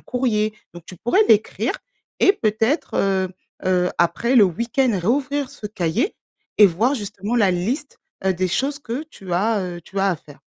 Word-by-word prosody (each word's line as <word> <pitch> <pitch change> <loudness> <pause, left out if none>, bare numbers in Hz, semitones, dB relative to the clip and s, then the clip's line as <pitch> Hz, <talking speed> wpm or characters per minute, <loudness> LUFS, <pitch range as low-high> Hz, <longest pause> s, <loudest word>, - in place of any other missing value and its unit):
courrier 215 -4 0 0.2
donc 175 -1 -11
tu 185 - -10
pourrais 305 - +3
l'écrire. 215 0 +2 0.5
Et 390 - +6
peut-être, 225 - 0
heu, 190 -1 +1 0.4
heu, 180 -1 +2
après 235 +9 +1
le 225 - +8
week-end, 235 +8 0
réouvrir 275 +7 0
ce 210 - -8
cahier 205 - -1 0.4
et 210 - +9
voir 220 +10 +1
justement 205 0 -3
la 205 -5 +4
liste, 240 - -3 0.3
heu, 190 - +3
des 185 +1 -1
choses 275 +10 -1
que 250 +1 -4
tu 185 -3 -9
as, 210 +3 +1
heu, 175 -2 -5
tu 195 - -7
as 195 - +3
à 180 - 0
faire. 145 -1 -17
215 Hz, 175 wpm, -21 LUFS, 185-250 Hz, 0.5 s, et